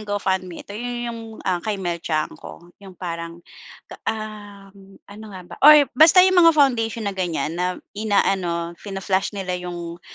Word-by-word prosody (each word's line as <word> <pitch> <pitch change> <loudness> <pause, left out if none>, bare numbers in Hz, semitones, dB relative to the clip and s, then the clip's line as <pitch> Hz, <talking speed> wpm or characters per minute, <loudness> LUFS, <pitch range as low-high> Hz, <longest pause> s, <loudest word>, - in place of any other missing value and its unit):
GoFundMe. 190 -4 -3
Ito - - -11
yun 240 +3 -5
yung, 230 - -8 0.2
ah, 180 -2 0
kay 215 +1 -3
Mel 175 -3 -3
Tiangco, 165 +2 -5
yung 190 -2 -13
parang 170 -1 -6 0.5
ka, - - -13
um, 200 -3 -8
ano 210 +2 -12
nga 190 -3 -9
ba - - -11
or 300 0 +9
basta 325 +7 +7
yung 375 -1 +4
mga 330 -2 +6
foundation 230 -5 +2
na 200 - -2
ganyan, 175 -4 -2
na 180 +1 -2 0.2
inaano, 190 -5 0
fina-flash 195 0 -2
nila 180 -2 -3
yung, 175 -1 -7
195 Hz, 160 wpm, -22 LUFS, 180-215 Hz, 0.5 s, or